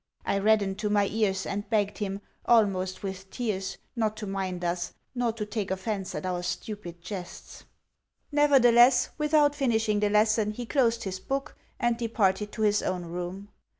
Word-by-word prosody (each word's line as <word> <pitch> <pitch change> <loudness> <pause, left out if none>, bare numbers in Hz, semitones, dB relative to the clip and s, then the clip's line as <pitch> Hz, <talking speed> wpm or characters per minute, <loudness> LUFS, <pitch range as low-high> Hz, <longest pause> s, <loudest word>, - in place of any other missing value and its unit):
I 200 - +1
reddened 200 -1 +2
to 210 -1 -1
my 205 -1 +3
ears, 195 -3 0
and 205 +1 -4
begged 205 -3 0
him, 200 -1 -3 0.3
almost 195 -5 +2
with 190 0 -6
tears, 195 -6 -3 0.2
not 215 -2 0
to 215 - -5
mind 190 -2 -3
us, 175 0 -2 0.2
nor 245 -2 0
to 220 -2 -4
take 210 -1 -3
offence 190 +1 -3
at - - -4
our 180 -1 -1
stupid 180 -1 -5
jests. 180 -2 -8 0.7
Nevertheless, 250 -4 +5
without 300 -1 +4
finishing 225 -7 +1
the 210 0 +2
lesson, 215 0 +3
he 240 +2 -5
closed 235 -3 +1
his 190 -1 -4
book, 275 +7 -3 0.2
and 240 -2 +1
departed 210 -3 0
to 220 - -2
his 210 -1 +3
own 180 -1 -2
room. 180 +4 -6
210 Hz, 165 wpm, -28 LUFS, 190-230 Hz, 0.7 s, Nevertheless